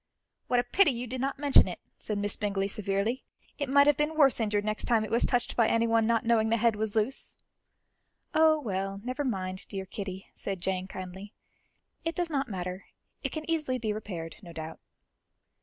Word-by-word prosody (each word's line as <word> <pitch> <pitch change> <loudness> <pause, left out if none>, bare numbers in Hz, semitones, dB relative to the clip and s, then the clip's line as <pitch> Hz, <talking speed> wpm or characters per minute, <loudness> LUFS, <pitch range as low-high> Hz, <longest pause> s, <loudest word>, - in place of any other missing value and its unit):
"What 245 - +3
a - - +2
pity 320 +8 +4
you 245 -2 -2
did 250 +1 -4
not 275 +1 -1
mention 285 -1 +6
it," - - -5 0.2
said 210 - -2
Miss 205 0 0
Bingley 200 -2 -1
severely; 200 +4 -1 0.4
"it 285 -2 -1
might 280 +1 +6
have 295 -2 +4
been 300 +1 0
worse 275 -5 +5
injured 210 -2 0
next 215 0 -1
time 225 -2 +3
it - - -8
was 235 - +3
touched 245 -1 0
by 230 -2 +4
anyone 230 -1 +3
not 230 0 +2
knowing 225 -1 +3
the 230 - +3
head 230 0 +3
was 215 0 -2
loose." 225 +5 -1 1.0
"Oh, 315 -1 +5
well, 195 -5 -3
never 255 +4 -2
mind, 185 -7 -3
dear 195 -2 -5
Kitty," 190 -1 -6
said 195 -2 -4
Jane 185 +1 -2
kindly; 190 +2 -8 0.7
"it 330 0 -2
does 350 -2 -1
not 275 -3 0
matter; 185 -1 -4 0.4
it - - -2
can 310 -1 -5
easily 305 -6 0
be 220 -3 -1
repaired, 175 -6 -6
no 175 -4 -10
doubt." 160 -1 -7
220 Hz, 195 wpm, -29 LUFS, 195-260 Hz, 1.0 s, mention